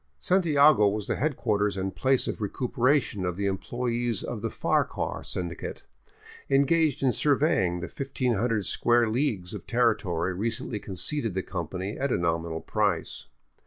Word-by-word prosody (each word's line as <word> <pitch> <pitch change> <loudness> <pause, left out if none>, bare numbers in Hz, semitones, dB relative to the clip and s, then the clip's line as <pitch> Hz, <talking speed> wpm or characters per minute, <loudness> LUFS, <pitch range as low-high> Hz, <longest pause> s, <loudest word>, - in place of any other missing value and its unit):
Santiago 150 - +4
was 105 0 -1
the - - -2
headquarters 105 -8 0
and 95 0 -3
place 130 -1 +2
of - - -4
recuperation 125 0 0
of 90 -1 -1
the 100 +2 -2
em 95 -1 -1
ployees 120 -2 -2
of 115 -4 -5
the 115 - -2
Farquhar - - -1
Syndicate, 85 -2 -4 0.7
engaged 140 +1 +3
in 130 - +4
surveying 120 - +2
the - - -3
1500 120 -4 -1
square 120 -1 +3
leagues 110 -7 -1
of - - -8
territory 100 -8 +1
recently 115 +2 -3
conceded 100 - -3
the 95 - -1
company 90 +3 -5
at 140 0 0
a - - +2
nominal 85 -1 -1
price. - - -1
115 Hz, 145 wpm, -27 LUFS, 95-130 Hz, 0.7 s, Santiago